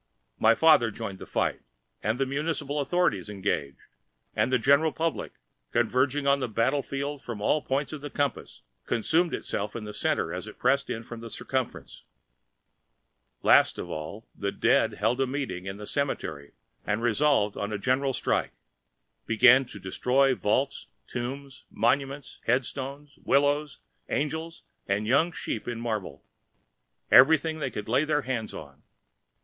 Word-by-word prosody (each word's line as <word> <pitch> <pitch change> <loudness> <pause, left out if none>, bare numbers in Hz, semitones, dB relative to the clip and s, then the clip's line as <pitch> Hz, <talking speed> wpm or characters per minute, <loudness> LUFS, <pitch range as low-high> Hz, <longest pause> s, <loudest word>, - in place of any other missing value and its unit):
My 115 +1 +5
father 150 -7 +5
joined 100 -3 -6
the - - -9
fight, - - -1 0.4
the 115 +6 0
municipal 145 +1 -2
authorities 140 - +1
engaged, 95 -9 -2 0.6
and - - +1
the 130 - +4
general 140 +6 +4
public, 165 +1 -2 0.4
converging 130 +4 +1
on 140 0 +4
the 130 - -1
battle 125 +6 +1
field 140 +1 -4
from 115 -3 -6
all 150 +8 +2
points 140 +2 -2
of 150 - -6
the 145 - -6
compass, 145 0 -3 0.2
consumed 160 +9 +2
itself 105 +1 -3
in 115 - -4
the 105 0 -7
center - - 0
as - - -5
it - - -10
pressed 140 0 +2
in 115 - -3
from 115 0 -9
the 115 0 -8
circumference. 130 +2 -4 1.4
Last - - +5
of - - -6
all, 80 +9 -6
the 100 0 -2
dead - - +2
held 115 +6 +1
a 135 - +2
meeting 130 -9 -4
in 95 +1 -5
the 105 - -8
cemetery 120 - -3 0.3
and 105 +2 -1
resolving 120 -3 +2
on 100 +1 -3
a 105 - -1
general 130 +5 +1
strike, - - 0 0.7
began 125 +4 +6
to - - -10
destroy 130 +8 +2
vaults, 130 +4 -1 0.2
tombs, 135 +2 -6
monuments, 135 +3 -1
headstones, 135 +3 -2
willows, 145 +2 +1 0.3
angels 160 +3 -3 0.2
and 100 +2 0
young 140 +9 +3
sheep 115 - -5
in 120 -1 -3
marble—everything 120 - +1
they 140 -3 -1
could 105 -3 -6
lay 125 +6 +3
their 150 -1 0
hands 120 -4 -3
on. - - -10
130 Hz, 150 wpm, -27 LUFS, 110-145 Hz, 1.4 s, began